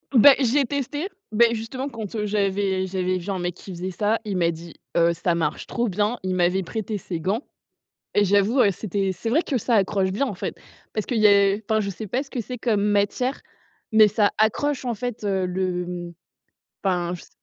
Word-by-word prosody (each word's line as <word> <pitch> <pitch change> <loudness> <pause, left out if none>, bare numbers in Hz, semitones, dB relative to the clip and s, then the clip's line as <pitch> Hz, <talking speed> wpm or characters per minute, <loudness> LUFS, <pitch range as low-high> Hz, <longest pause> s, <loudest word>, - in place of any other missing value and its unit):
Ben 270 +4 +9
j'ai 275 +2 +3
testé, 285 +5 -3 0.2
ben 230 +2 +4
justement 235 +4 -4
quand, 225 -6 -6
heu, 210 -1 -1
j'avais 195 -2 0
j'avais 185 0 -1
vu 175 - -8
un 195 - -1
mec 175 0 -2
qui 190 - -11
faisait 180 +1 -4
ça, 210 +4 +1
il 200 -3 -2
m'a 170 -1 +3
dit: 170 0 -7 0.2
«Heu, 170 0 +4
ça 170 +1 0
marche 160 -3 -2
trop 240 0 -1
bien». 210 +4 0
Il 185 0 -1
m'avait 180 +1 +2
prêté 215 +3 -4
ses 175 -3 -5
gants 200 - -1 0.7
et 205 - +4
j'avoue, 205 +6 +3
heu, 205 - +5
c'était 195 0 -2
c'est 205 +5 -4
vrai 310 +8 +3
que 280 - -2
ça 240 +1 +1
accroche 195 -1 +1
bien 245 +8 0
en 245 - -4
fait, 195 +1 -4 0.4
parce 215 - -2
qu'il 245 - -1
y - - +8
a 200 -1 +5
enfin 220 +1 +2
je 200 - -2
sais 200 +3 -6
pas 245 +7 -1
ce 280 - -14
que 245 - -3
c'est 250 +3 -7
comme 220 -4 +1
matière, 205 +6 +1 0.5
mais 220 -1 +7
ça 210 0 +2
accroche 260 +6 +1
en 245 - -1
fait, 245 -1 -5
heu, 190 -2 0
le 180 -1 -3 0.7
enfin 180 -3 0
je 180 - -7
s - - -17
205 Hz, 215 wpm, -24 LUFS, 185-230 Hz, 0.7 s, Ben